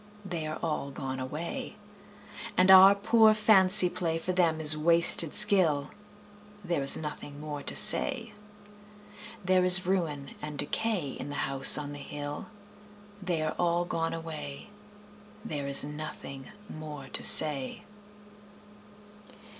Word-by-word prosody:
They 170 Hz, -5 st, -7 dB
are 155 Hz, -, -7 dB
all 150 Hz, -4 st, -5 dB
gone 135 Hz, -2 st, -8 dB
away. 150 Hz, +6 st, -8 dB, 0.8 s
And 185 Hz, +1 st, +2 dB
our 190 Hz, +1 st, +6 dB
poor 220 Hz, +1 st, +1 dB
fancy 195 Hz, -3 st, +4 dB
play 175 Hz, -2 st, -5 dB
For 175 Hz, +3 st, -6 dB
them 170 Hz, -3 st, -2 dB
is 155 Hz, -1 st, +2 dB
wasted 165 Hz, 0 st, +3 dB
skill: 180 Hz, -9 st, +4 dB, 0.7 s
There 170 Hz, -5 st, -4 dB
is 135 Hz, -, +2 dB
nothing 150 Hz, -2 st, -10 dB
more 150 Hz, -1 st, -9 dB
to -, -, -5 dB
say. 235 Hz, -6 st, +4 dB, 1.1 s
There 185 Hz, 0 st, 0 dB
is 180 Hz, 0 st, +6 dB
ruin 160 Hz, -7 st, -5 dB
and 150 Hz, -1 st, -9 dB
decay 175 Hz, 0 st, -5 dB
In 135 Hz, -, -10 dB
the 145 Hz, -, -5 dB
House 135 Hz, 0 st, +4 dB
on 145 Hz, -1 st, -8 dB
the 145 Hz, -, -11 dB
Hill 145 Hz, 0 st, -10 dB, 0.7 s
They 175 Hz, -4 st, -4 dB
are 155 Hz, -, -5 dB
all 175 Hz, 0 st, -2 dB
gone 165 Hz, -1 st, -5 dB
away, 160 Hz, 0 st, -11 dB, 0.8 s
There 145 Hz, -9 st, -7 dB
is 140 Hz, -, +3 dB
nothing 150 Hz, -2 st, -11 dB, 0.2 s
more 150 Hz, -5 st, -12 dB
to -, -, -2 dB
say. 150 Hz, -, +4 dB
160 Hz, 130 wpm, -26 LUFS, 145-185 Hz, 1.1 s, our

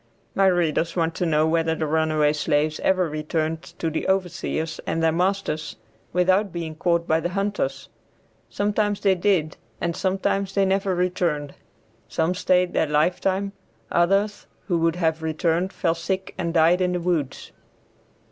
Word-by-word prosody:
My 195 Hz, 0 st, +3 dB
readers 170 Hz, -2 st, +1 dB
want 165 Hz, -2 st, +1 dB
to 175 Hz, -, -1 dB
know 155 Hz, -1 st, +3 dB
whether 165 Hz, 0 st, +1 dB
the 160 Hz, -, -2 dB
runaway 155 Hz, -1 st, +2 dB
slaves 150 Hz, +1 st, 0 dB
ever 185 Hz, -2 st, +2 dB
returned 155 Hz, +1 st, -2 dB, 0.2 s
to 165 Hz, -, -2 dB
the 160 Hz, -, -2 dB
overseers 175 Hz, -4 st, -1 dB
and 165 Hz, -, -1 dB
their 160 Hz, -, +4 dB
masters 170 Hz, -4 st, -1 dB, 0.4 s
without 185 Hz, +3 st, +2 dB
being 165 Hz, -2 st, -4 dB
caught 170 Hz, +1 st, 0 dB
by 160 Hz, 0 st, +3 dB
the 175 Hz, -, -2 dB
hunters. 195 Hz, -8 st, -2 dB, 0.6 s
Sometimes 205 Hz, 0 st, 0 dB
they 195 Hz, -2 st, +4 dB
did 175 Hz, -4 st, +1 dB, 0.2 s
and 170 Hz, -1 st, -1 dB
sometimes 195 Hz, +1 st, -1 dB
they 195 Hz, -1 st, +3 dB
never 190 Hz, 0 st, +1 dB
returned. 175 Hz, -5 st, -1 dB, 0.5 s
Some 165 Hz, +2 st, 0 dB
stayed 180 Hz, -1 st, +2 dB
their 160 Hz, -, +2 dB
lifetime; 185 Hz, +6 st, +1 dB, 0.4 s
others, 195 Hz, +4 st, +1 dB, 0.2 s
who 175 Hz, -4 st, +1 dB
would 165 Hz, 0 st, +2 dB
have 160 Hz, -2 st, 0 dB
returned, 165 Hz, +3 st, 0 dB
fell 165 Hz, -4 st, 0 dB
sick 185 Hz, +3 st, -3 dB
and 170 Hz, -3 st, -2 dB
died 170 Hz, +2 st, +4 dB
in 180 Hz, 0 st, +1 dB
the 180 Hz, -, 0 dB
woods. 170 Hz, -6 st, -2 dB
170 Hz, 155 wpm, -24 LUFS, 160-190 Hz, 0.6 s, their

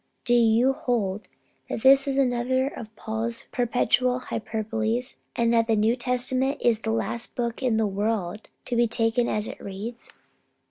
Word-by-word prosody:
Do 240 Hz, -, +2 dB
you 235 Hz, +2 st, +4 dB
hold 215 Hz, -6 st, -2 dB, 0.4 s
that 225 Hz, -, -4 dB
this 270 Hz, +1 st, +6 dB
is 275 Hz, -, 0 dB
just 275 Hz, -, +4 dB
another 255 Hz, +2 st, 0 dB
of 220 Hz, -5 st, -8 dB
Paul's 225 Hz, +1 st, -3 dB
perpetual 250 Hz, +1 st, +2 dB
hyperboles, 225 Hz, +1 st, -2 dB, 0.2 s
and 235 Hz, 0 st, +2 dB
that 230 Hz, -1 st, +3 dB
the 225 Hz, -, +3 dB
New 215 Hz, +3 st, +3 dB
Testament 255 Hz, +2 st, 0 dB
is 230 Hz, -3 st, +2 dB
the 220 Hz, -, -4 dB
last 230 Hz, +1 st, -2 dB
book 235 Hz, 0 st, -2 dB
in 245 Hz, -4 st, +1 dB
the 220 Hz, -, +2 dB
world 205 Hz, -1 st, -2 dB, 0.2 s
to 245 Hz, -, -2 dB
be 235 Hz, 0 st, +4 dB
taken 230 Hz, +1 st, +1 dB
as 210 Hz, 0 st, -1 dB
it -, -, -8 dB
reads? 210 Hz, +5 st, -7 dB
235 Hz, 170 wpm, -25 LUFS, 220-250 Hz, 0.4 s, this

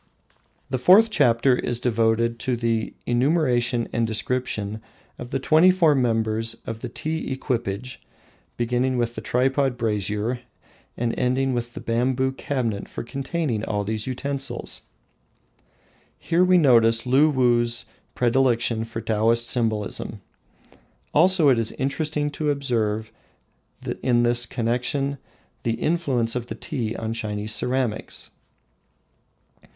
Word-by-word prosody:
The 130 Hz, -, 0 dB
fourth 200 Hz, -, +6 dB
chapter 125 Hz, -, +3 dB
is 120 Hz, -1 st, -2 dB
devoted 115 Hz, 0 st, +1 dB
to 125 Hz, +1 st, -1 dB
the 115 Hz, -1 st, -1 dB
enumeration 120 Hz, -3 st, +1 dB
and 115 Hz, -1 st, +1 dB
description 110 Hz, -2 st, -2 dB, 0.4 s
of 120 Hz, -, -7 dB
the -, -, -1 dB
twenty 155 Hz, +6 st, +5 dB
four 175 Hz, -5 st, +4 dB
members 115 Hz, -3 st, 0 dB
of 115 Hz, -1 st, -5 dB
the -, -, -6 dB
tea 160 Hz, -2 st, -3 dB
equipage, 125 Hz, -2 st, -3 dB, 0.6 s
beginning 125 Hz, +2 st, 0 dB
with 120 Hz, -1 st, -1 dB
the -, -, -6 dB
tripod 130 Hz, +1 st, +1 dB
brazier 105 Hz, +1 st, -1 dB, 0.6 s
and 120 Hz, -1 st, -1 dB
ending 130 Hz, +1 st, +1 dB
with 120 Hz, 0 st, -4 dB
the -, -, -5 dB
bamboo 130 Hz, +3 st, 0 dB
cabinet 125 Hz, -6 st, -3 dB
for -, -, -6 dB
containing 135 Hz, -1 st, -3 dB
all 105 Hz, -2 st, -1 dB
these 110 Hz, +2 st, -3 dB
utensils. 135 Hz, +1 st, -3 dB, 1.4 s
Here 170 Hz, +2 st, +1 dB
we 185 Hz, 0 st, +5 dB
notice 115 Hz, -7 st, +5 dB
Luwuh's 125 Hz, -4 st, +3 dB, 0.3 s
predilection 120 Hz, -2 st, +2 dB
for 115 Hz, 0 st, -6 dB
Taoist 115 Hz, +2 st, +1 dB
symbolism. 110 Hz, -4 st, -2 dB, 0.9 s
Also 185 Hz, -4 st, +5 dB
it 125 Hz, -3 st, +4 dB
is 115 Hz, -, -1 dB
interesting 150 Hz, +2 st, -1 dB
to 150 Hz, +1 st, -2 dB
observe 115 Hz, -6 st, -1 dB, 0.9 s
in 120 Hz, -2 st, +2 dB
this 120 Hz, 0 st, +2 dB
connection 125 Hz, +5 st, -1 dB, 0.4 s
the 115 Hz, -, -1 dB
influence 130 Hz, -4 st, 0 dB
of 120 Hz, -1 st, -3 dB
tea 115 Hz, -4 st, -3 dB
on 110 Hz, 0 st, -3 dB
Chinese 105 Hz, -1 st, -3 dB
ceramics. 125 Hz, 0 st, -3 dB
120 Hz, 120 wpm, -23 LUFS, 115-135 Hz, 1.4 s, fourth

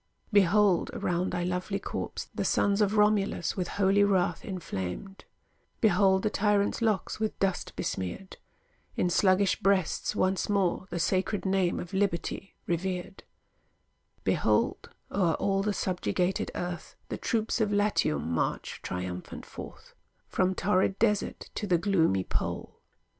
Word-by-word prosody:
Behold, 200 Hz, -2 st, +4 dB
around 180 Hz, +1 st, 0 dB
thy 175 Hz, -1 st, -1 dB
lovely 180 Hz, +3 st, -1 dB
corpse, 200 Hz, -, -5 dB
the -, -, -2 dB
sons 200 Hz, +1 st, +2 dB
Of 210 Hz, +1 st, +2 dB
Romulus 210 Hz, -3 st, +2 dB
with 180 Hz, -2 st, -2 dB
holy 200 Hz, 0 st, +3 dB
wrath 185 Hz, -4 st, +1 dB
inflamed; 175 Hz, -, -5 dB, 0.5 s
Behold 190 Hz, -2 st, +4 dB
the 215 Hz, -, +2 dB
tyrants 205 Hz, 0 st, +1 dB
locks 215 Hz, -3 st, 0 dB
with 220 Hz, -1 st, -2 dB
dust 195 Hz, -2 st, -1 dB
besmeared; 95 Hz, -, -4 dB, 0.6 s
In 180 Hz, -, +1 dB
sluggish 190 Hz, +2 st, +3 dB
breasts 195 Hz, -4 st, +1 dB
once 185 Hz, 0 st, +1 dB
more 190 Hz, -2 st, +1 dB
The -, -, -3 dB
sacred 185 Hz, +5 st, 0 dB
name 190 Hz, -2 st, +1 dB
of 180 Hz, -, -7 dB
Liberty 190 Hz, 0 st, -1 dB
revered; 180 Hz, +2 st, -3 dB, 1.0 s
Behold -, -, +1 dB, 0.2 s
o'er 175 Hz, -5 st, +2 dB
all 195 Hz, 0 st, +1 dB
the 210 Hz, +1 st, 0 dB
subjugated 185 Hz, -1 st, -1 dB
earth, 175 Hz, 0 st, -5 dB
The -, -, -3 dB
troops 225 Hz, 0 st, 0 dB
of 210 Hz, -1 st, +1 dB
Latium 205 Hz, -, +1 dB
march 85 Hz, -1 st, -2 dB
triumphant 90 Hz, 0 st, -5 dB
forth, -, -, -10 dB, 0.3 s
From 185 Hz, 0 st, +1 dB
torrid 190 Hz, 0 st, +1 dB
desert 210 Hz, -2 st, 0 dB
to 210 Hz, -, -3 dB
the 180 Hz, -3 st, +4 dB
gloomy 165 Hz, -, +2 dB
pole. -, -, -4 dB
190 Hz, 130 wpm, -29 LUFS, 175-205 Hz, 1.0 s, Behold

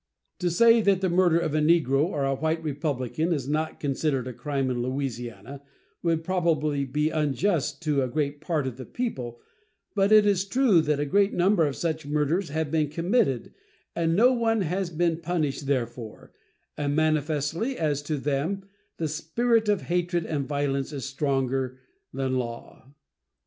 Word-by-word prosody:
To 180 Hz, -, +1 dB
say 230 Hz, +6 st, +5 dB
that 195 Hz, -3 st, +2 dB
the 185 Hz, -2 st, +1 dB
murder 175 Hz, -2 st, +4 dB
of 165 Hz, -3 st, -1 dB
a 155 Hz, -, +2 dB
negro 150 Hz, -3 st, +3 dB
or 150 Hz, -5 st, -1 dB
a 135 Hz, -, +1 dB
white 160 Hz, +3 st, -1 dB
Republican 150 Hz, +1 st, -2 dB
is 140 Hz, -6 st, -1 dB
not 155 Hz, +2 st, -2 dB
considered 135 Hz, -2 st, -1 dB
a 125 Hz, -, -5 dB
crime 135 Hz, 0 st, -2 dB
in 120 Hz, -1 st, -2 dB
Louisiana 130 Hz, 0 st, -4 dB, 0.4 s
would 165 Hz, -1 st, 0 dB
probably 155 Hz, -5 st, 0 dB
be 150 Hz, +4 st, 0 dB
unjust 150 Hz, +1 st, 0 dB
to 150 Hz, -3 st, +1 dB
a 130 Hz, -, 0 dB
great 145 Hz, +2 st, -2 dB
part 155 Hz, -4 st, -1 dB
of 130 Hz, -2 st, -4 dB
the 130 Hz, -, -7 dB
people, 125 Hz, -, -4 dB, 0.5 s
but 200 Hz, 0 st, +2 dB
it 215 Hz, -1 st, +7 dB
is 200 Hz, -3 st, +2 dB
true 210 Hz, -4 st, +3 dB
that 150 Hz, -2 st, 0 dB
a 145 Hz, -, 0 dB
great 200 Hz, +7 st, +2 dB
number 175 Hz, -2 st, +3 dB
of 140 Hz, -, -3 dB
such 160 Hz, -3 st, -3 dB
murders 150 Hz, +5 st, 0 dB
have 155 Hz, 0 st, -2 dB
been 155 Hz, -2 st, +1 dB
committed 165 Hz, -, 0 dB, 0.4 s
and 165 Hz, -1 st, +1 dB
no 245 Hz, +6 st, +5 dB
one 225 Hz, -3 st, +1 dB
has 185 Hz, +1 st, -1 dB
been 170 Hz, 0 st, 0 dB
punished 155 Hz, -5 st, -2 dB
therefor; 120 Hz, -4 st, -3 dB, 0.4 s
and 145 Hz, -1 st, -1 dB
manifestly, 155 Hz, -, 0 dB
as 150 Hz, -3 st, 0 dB
to 150 Hz, +1 st, -3 dB
them, 145 Hz, +8 st, -1 dB, 0.3 s
the 160 Hz, -, -1 dB
spirit 220 Hz, +9 st, +1 dB
of 205 Hz, -2 st, +2 dB
hatred 175 Hz, -1 st, -1 dB
and 145 Hz, -3 st, -2 dB
violence 140 Hz, -1 st, -1 dB
is 140 Hz, -5 st, -5 dB
stronger 135 Hz, -2 st, -1 dB, 0.3 s
than 130 Hz, -1 st, -1 dB
law. 120 Hz, +2 st, -7 dB
155 Hz, 170 wpm, -26 LUFS, 140-175 Hz, 0.5 s, it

